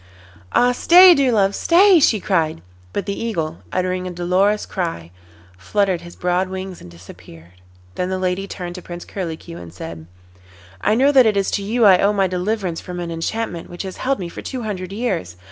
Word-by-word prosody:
'Ah! 245 0 +4
stay, 355 +8 +7
dear 275 -5 +2
love, 200 -3 +2
stay,' 360 - +5
she 225 -7 +3
cried. 160 - -1 0.3
But 200 - -3
the 200 - -2
Eagle, 165 -8 -3
uttering 185 0 -1
a - - -4
dolorous 185 +4 +1
cry, 165 - -4 0.5
fluttered 190 - 0
his 175 0 -12
broad 180 +1 0
wings 190 -1 -7
and 90 - -12
disappeared. 85 0 -15 0.3
Then 180 - -3
the 190 - -1
lady 185 +1 -2
turned 175 -3 -6
to 180 - -8
Prince 175 0 -9
Curlicue, 170 -2 -6
and 85 -1 -10
said: 80 -2 -9 0.7
'I 210 - +2
know 270 +4 +4
that 260 -4 +6
it 210 -2 +1
is 195 - 0
to - - -1
you 225 +3 +1
I 190 -3 +7
owe 205 +1 +3
my 195 -2 +2
deliverance 185 -1 -2
from 180 -1 -7
an 170 -1 -4
enchantment 170 +2 -4
which 175 +2 -7
has 190 -1 -7
held 270 +1 0
me 180 - -5
for 170 - -9
two 255 -3 -5
hundred 185 -4 -5
years. 200 - -3
185 Hz, 195 wpm, -20 LUFS, 170-210 Hz, 0.7 s, stay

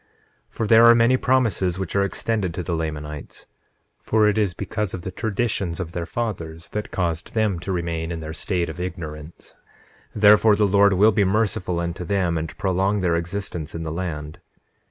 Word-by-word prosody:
9:16 - - -31
For 115 - -1
there 115 +2 +7
are 115 0 +8
many 120 +2 +4
promises 115 -9 +1
which 95 -2 -4
are 100 - +3
extended 100 -2 -2
to 90 - -3
the 85 - -3
Lamanites; 75 -2 -5 0.6
for 110 -1 +3
it 105 - +2
is 105 -5 0
because 105 0 -3
of 90 - -8
the 95 - -5
traditions 100 -4 -2
of 85 -3 -4
their 85 -1 -4
fathers 85 -8 -4
that 105 0 -4
caused 85 0 -3
them 105 -5 +1
to 95 - -5
remain 85 -2 -2
in 85 - -4
their 80 0 -6
state 85 +1 -1
of 80 +2 -7
ignorance; 80 -3 -7 0.6
therefore 105 +1 +6
the 105 - +2
Lord 100 0 +4
will 105 +4 +5
be 100 0 +2
merciful 95 -3 0
unto 85 +1 -3
them 90 -1 0
and 80 -1 -4
prolong 95 +1 0
their 85 -2 +1
existence 85 -2 -4
in 85 - -4
the 80 - -4
land. 75 -3 -5
90 Hz, 190 wpm, -23 LUFS, 85-105 Hz, 0.6 s, are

